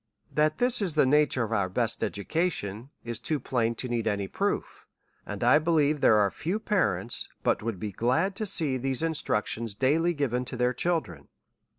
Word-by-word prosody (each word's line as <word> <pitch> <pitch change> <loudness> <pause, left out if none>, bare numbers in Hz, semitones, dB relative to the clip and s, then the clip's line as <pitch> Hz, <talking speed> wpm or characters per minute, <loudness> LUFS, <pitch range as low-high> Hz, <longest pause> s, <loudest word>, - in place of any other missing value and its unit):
That 155 0 +2
this 245 -2 +2
is 180 -6 -1
the 150 - +4
nature 145 -2 +3
of 115 - -4
our 100 -4 +1
best 115 +4 -1
education, 115 - -2
is 120 -1 -4
too 155 -2 -2
plain 120 -3 -1
to 125 - -5
need 120 -2 -2
any 100 -2 -1
proof; - - -3 0.4
and - - -5
I 150 - +6
believe 155 -2 +2
there 110 - +5
are 100 -2 +3
few 180 +6 -2
parents, 120 - 0
but - - +1
would 110 -4 -4
be 105 +1 -4
glad 130 - 0
to 215 -2 -2
see 150 -7 +1
these 135 +3 0
instructions 115 -8 -1
daily 160 +8 +2
given 125 -4 -1
to 125 - -6
their 125 +1 +1
children. 125 - -2
130 Hz, 185 wpm, -27 LUFS, 110-160 Hz, 0.4 s, I